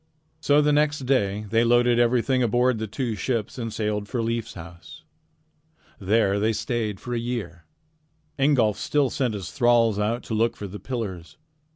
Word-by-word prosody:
So 150 -1 +3
the 150 0 +3
next 150 -1 +1
day 105 -6 0
they 115 +1 +3
loaded 120 0 +3
everything 125 +2 +2
aboard 120 0 +2
the 110 - -3
two 115 +2 -3
ships 115 +2 -3
and 115 -2 -4
sailed 105 -1 -2
for 120 -2 -2
Leif's 115 0 -3
house. 80 -1 -12 1.0
There 100 0 +2
they 110 +2 +1
stayed 110 -3 -2
for 120 - -6
a 120 - 0
year. 110 -8 -5 0.7
Ingolf 130 -7 +3
still 145 -3 +1
sent 125 -7 -1
his 100 -3 -6
thralls 120 -4 +3
out 115 +4 -1
to - - -6
look 115 +1 +1
for 105 - -6
the 100 +1 -8
pillars. 95 - -6
115 Hz, 170 wpm, -24 LUFS, 105-125 Hz, 1.0 s, So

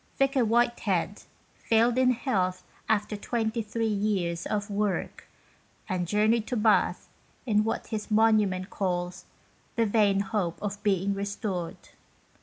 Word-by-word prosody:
Vicar 275 -2 +3
Whitehead 225 -5 +1 0.4
failed 230 +1 +3
in 255 -1 +4
health 195 -8 0 0.3
after 210 0 +1
23 225 0 -2
years 200 -5 -1
of 205 -1 -2
work, 200 -2 -2 0.6
and 180 -2 -2
journeyed 215 +3 +2
to 250 - -2
Bath 215 0 +2 0.4
in 210 -3 +3
what 225 - -2
his 215 -2 -5
monument 210 -4 +2
calls 180 -1 -2 0.5
"the 230 -2 +2
vain 205 -2 +3
hope 195 -5 -2
of 205 0 -4
being 200 -1 +1
restored." 200 -3 -3
210 Hz, 120 wpm, -27 LUFS, 195-225 Hz, 0.6 s, in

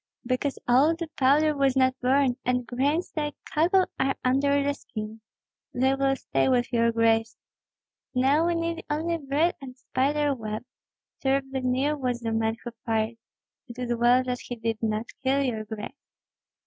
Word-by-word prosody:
"Because 255 +3 -1
all 275 +7 +5
the 335 -1 -5
powder 295 +3 +3
was 275 -2 +2
not 260 -1 +4
burned, 260 0 +3
and 250 0 0
grains 285 +8 -1
like 295 -2 -2
cockle 360 +5 +3
are 270 0 +1
under 280 +2 +3
the 285 0 +1
skin. 220 -4 -8 0.5
They 265 +2 +3
will 270 0 +1
stay 265 - 0
with 245 -1 +1
your 230 0 +3
grace. 225 -1 +2 0.8
Now 280 +6 +3
we 345 - +1
need 335 0 -2
only 330 +3 -1
bread 295 +4 +1
and 255 -1 -9
spider 285 +3 0
web. 220 -2 -5 0.6
Terribly 270 0 0
near 260 +4 +1
was 250 -4 -2
the 230 -2 -3
man 225 0 0
who 240 - -5
fired. 225 0 -1 0.5
It 240 0 -10
is 245 -1 -1
well 240 +2 +4
that 250 -1 -3
he 245 - -6
did 225 -1 -3
not 220 0 -1 0.2
kill 270 +1 +2
your 225 -5 -2
grace." 220 +6 -7
260 Hz, 165 wpm, -26 LUFS, 240-285 Hz, 0.8 s, all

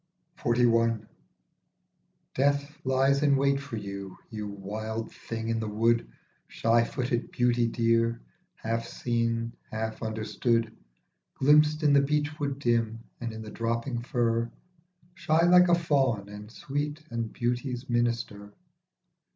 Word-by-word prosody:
45 120 +1 +2
XLI. 115 -2 +1 1.3
DEATH 140 +2 +1
lies 135 +1 +2
in 145 -2 +4
wait 140 0 +2
for 140 -4 -6
you, 100 -2 -7
you 105 -2 -4
wild 110 +3 -5
thing 115 -1 -5
in 115 0 0
the 110 - -3
wood, 115 - +1 0.4
Shy 115 +1 +2
footed 120 0 -2
beauty 120 -1 +2
dear, 115 0 +1 0.4
half 115 -3 -3
seen, 115 -1 -1 0.2
half 110 0 -4
understood, 110 +1 -1 0.6
Glimpsed 150 +2 +4
in 145 -2 +5
the 140 - +6
beech 150 +2 -1
wood 140 -2 -2
dim 115 -3 0 0.2
and 120 -2 -4
in 110 0 -7
the 110 - -9
dropping 115 +2 -2
fir, 115 -2 0 0.6
Shy 170 -2 +2
like 180 +1 +7
a 175 - +5
fawn 135 -11 +1
and 105 +1 -9
sweet 145 +5 -4
and 115 -1 -3
beauty's 125 +1 -2
minister. 115 -4 -1
115 Hz, 130 wpm, -28 LUFS, 115-140 Hz, 1.3 s, like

